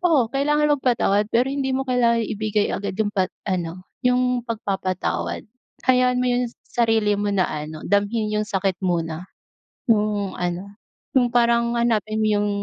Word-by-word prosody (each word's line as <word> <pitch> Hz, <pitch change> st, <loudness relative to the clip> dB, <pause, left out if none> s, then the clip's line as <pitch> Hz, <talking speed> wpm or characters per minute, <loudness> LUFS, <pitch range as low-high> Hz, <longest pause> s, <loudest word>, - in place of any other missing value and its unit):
Oo 295 Hz, -10 st, +4 dB
kailangan 295 Hz, +2 st, +2 dB
magpatawad 220 Hz, -6 st, +1 dB
pero 245 Hz, +3 st, +3 dB
hindi 270 Hz, -1 st, -1 dB
mo 260 Hz, -, 0 dB
kailangan 235 Hz, -2 st, +3 dB
ibigay 210 Hz, 0 st, 0 dB
agad 200 Hz, -, -3 dB
yung 215 Hz, -, +2 dB
pa 195 Hz, -2 st, +1 dB, 0.2 s
ano 180 Hz, -1 st, -3 dB, 0.2 s
yung 250 Hz, -1 st, +2 dB
pagpapatawad, 195 Hz, -5 st, -2 dB, 0.4 s
hayaan 250 Hz, -1 st, +3 dB
mo 250 Hz, -, +1 dB
yung 245 Hz, 0 st, +1 dB, 0.2 s
sarili 225 Hz, -3 st, +1 dB
mo 205 Hz, 0 st, 0 dB
na 190 Hz, -, +3 dB
ano, 155 Hz, +1 st, -6 dB
damhin 205 Hz, +3 st, 0 dB
yung 210 Hz, 0 st, -1 dB
sakit 195 Hz, -2 st, -1 dB
muna, 170 Hz, -2 st, -2 dB, 0.6 s
yung 210 Hz, -3 st, +1 dB
ano, 180 Hz, +3 st, -3 dB, 0.4 s
yung 250 Hz, -2 st, +3 dB
parang 235 Hz, 0 st, +2 dB
hanapin 220 Hz, -2 st, +1 dB
mo -, -, +2 dB
yung 205 Hz, -, 0 dB
215 Hz, 150 wpm, -22 LUFS, 195-245 Hz, 0.6 s, Oo